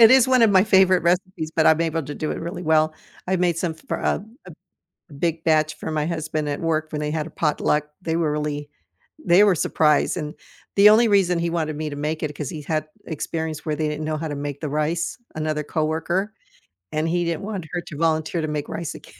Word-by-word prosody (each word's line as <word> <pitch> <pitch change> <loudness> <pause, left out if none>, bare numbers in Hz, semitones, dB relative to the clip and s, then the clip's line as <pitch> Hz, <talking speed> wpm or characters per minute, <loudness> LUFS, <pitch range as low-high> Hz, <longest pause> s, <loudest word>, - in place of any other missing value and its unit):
It 225 0 +9
is 260 -1 +6
one 255 -2 +5
of 225 - +6
my 190 -1 +6
favorite 190 -3 +5
recipes, 175 -2 0
but 160 - +3
I'm 160 +1 +5
able 165 -1 0
to 145 +1 -6
do 155 - -3
it - - -3
really 175 +2 -5
well. 155 -1 +3 0.3
I've 185 -1 0
made 175 -2 +2
some 170 -2 -1
for 160 - -5
a 200 - -1 0.9
a - - -11
big 165 +2 -2
batch 155 -1 +2
for - - -6
my 155 0 0
husband 155 -2 -2
at 145 - -2
work 155 -1 -1
when 150 - -3
they 150 0 -2
had 155 0 -2
a - - -9
potluck. 150 -1 +1 0.2
They 165 -2 -1
were 160 -3 +1
really 150 -1 -3 0.5
they 180 +3 +6
were 200 -3 +5
surprised, 150 -1 +2
and 150 -2 -4 0.4
the 205 +1 +8
only 225 +2 +6
reason 190 -4 +3
he 170 0 0
wanted 155 -3 -1
me 155 +1 -3
to - - -5
make 155 +2 -3
it 150 -1 -3
'cause 150 -3 -4
he 155 - -6
had 155 0 -2 0.2
experience 160 0 -4
where 155 - -1
they 155 0 -1
didn't 150 +1 -3
know 155 0 -1
how 160 +1 -3
to 145 - -3
make 145 0 -5
the 155 - -3
rice, 155 +3 -1 0.2
another 155 -1 -1
coworker, 165 +7 -1 0.6
and 155 +1 0
he 175 +1 +1
didn't 170 -2 -2
want 195 -5 -5
her 175 - -1
to 150 - -9
volunteer 160 +1 +1
to 155 - -2
make 150 -1 -3
rice 170 -1 -4
again. - - -14
160 Hz, 235 wpm, -23 LUFS, 150-175 Hz, 0.9 s, It